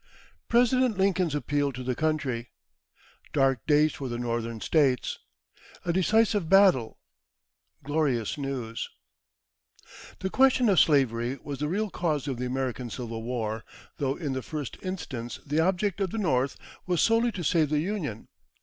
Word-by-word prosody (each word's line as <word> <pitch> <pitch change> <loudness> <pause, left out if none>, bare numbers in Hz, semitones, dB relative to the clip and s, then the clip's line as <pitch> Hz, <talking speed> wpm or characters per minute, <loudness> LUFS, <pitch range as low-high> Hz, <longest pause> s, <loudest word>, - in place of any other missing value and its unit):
President 245 -1 +3
Lincoln's 185 -5 +2
Appeal 145 -1 0
to 130 +1 -6
the 125 0 -1
Country 135 -5 -1 0.8
Dark 135 -4 +2
Days 150 0 +4
for 135 -2 -5
the 120 - -3
Northern 115 -1 -3
States 135 -2 +1 0.7
A 170 - +1
Decisive 205 -1 +2
Battle 190 - +5 0.9
Glorious 140 -6 0
News. 130 -5 -4 1.3
The 190 - -3
question 260 -3 +4
of 190 - +5
slavery 130 -4 +2
was 140 -2 -5
the 150 - -1
real 205 +5 -1
cause 150 -5 -1
of 135 -3 -2
the 125 - -2
American 130 -1 -3
Civil 115 -1 -5
War, 115 -2 -3 0.3
though 135 -1 0
in 150 -5 -3
the 130 - -2
first 150 -1 -5
instance 135 -11 -5
the 150 +2 0
object 190 +3 +1
of 190 - +1
the 225 - -5
North 135 -9 +1 0.3
was 180 -2 +1
solely 230 +1 +3
to 180 - -4
save 160 -2 +2
the 150 - +1
Union. 160 - -4
145 Hz, 150 wpm, -27 LUFS, 125-185 Hz, 1.3 s, Battle